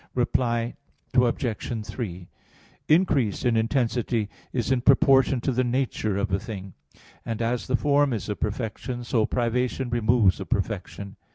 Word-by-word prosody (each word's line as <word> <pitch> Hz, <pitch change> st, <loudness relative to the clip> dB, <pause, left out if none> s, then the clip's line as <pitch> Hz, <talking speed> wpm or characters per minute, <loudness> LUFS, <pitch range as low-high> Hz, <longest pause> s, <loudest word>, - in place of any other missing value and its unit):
Reply 120 Hz, -1 st, 0 dB, 0.4 s
Obj. 120 Hz, -2 st, 0 dB
3: 90 Hz, -8 st, -6 dB, 0.6 s
Increase 150 Hz, -, +2 dB
in 120 Hz, -2 st, +3 dB
intensity 115 Hz, -2 st, 0 dB, 0.2 s
is 120 Hz, -1 st, -1 dB
in 130 Hz, -2 st, +2 dB
proportion 135 Hz, -1 st, +4 dB
to 135 Hz, -, 0 dB
the 130 Hz, +1 st, +1 dB
nature 120 Hz, -5 st, -1 dB
of 100 Hz, -1 st, -1 dB
a 95 Hz, -, +1 dB
thing. 95 Hz, -4 st, -7 dB, 0.5 s
And 115 Hz, -1 st, -4 dB
as 120 Hz, +1 st, -1 dB
the 130 Hz, -, +2 dB
form 145 Hz, 0 st, +2 dB
is 105 Hz, -6 st, -3 dB
a 105 Hz, -, -2 dB
perfection, 120 Hz, +4 st, -4 dB
so 115 Hz, -2 st, +1 dB
privation 125 Hz, +1 st, -1 dB
removes 115 Hz, -4 st, +3 dB
a -, -, -5 dB
perfection. 100 Hz, -1 st, -3 dB
120 Hz, 145 wpm, -25 LUFS, 110-130 Hz, 0.6 s, proportion